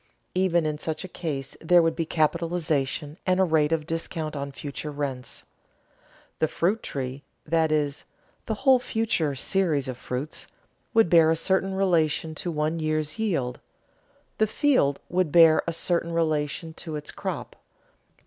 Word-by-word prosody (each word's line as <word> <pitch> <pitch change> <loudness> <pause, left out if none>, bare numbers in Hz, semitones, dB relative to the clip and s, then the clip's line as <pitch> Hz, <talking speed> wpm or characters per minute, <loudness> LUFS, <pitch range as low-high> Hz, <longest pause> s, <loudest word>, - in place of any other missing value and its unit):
Even 180 -3 +2
in 150 -1 -2
such 160 +2 -3
a - - -6
case 150 -7 -5
there 175 +1 +5
would 165 0 +1
be 165 -2 -2
capitalization 155 -2 0
and 185 0 +3
a - - +6
rate 160 -3 +2
of 160 -2 0
discount 160 -1 -3
on 140 0 -4
future 145 +2 -6
rents. 140 -4 -4 1.0
The 160 - +3
fruit 195 +8 0
tree 130 0 -5 0.2
(that 160 0 +2
is, 150 -2 0 0.4
the 220 - -1
whole 260 -2 +7
future 215 - -1
series 155 -3 +1
of 130 -2 -4
fruits) 130 +5 -5 0.5
would 225 -4 +6
bear 165 -1 +6
a 165 - +3
certain 190 +3 0
relation 165 -4 +1
to 175 - -3
one 155 +1 -1
year's 155 0 -1
yield; 140 - -1 0.8
the 215 - +4
field 215 - +2
would 180 -3 0
bear 165 -1 +7
a - - +1
certain 170 0 0
relation 160 0 -1
to 160 -2 -5
its 150 0 -4
crop. - - -5
160 Hz, 155 wpm, -26 LUFS, 150-175 Hz, 1.0 s, whole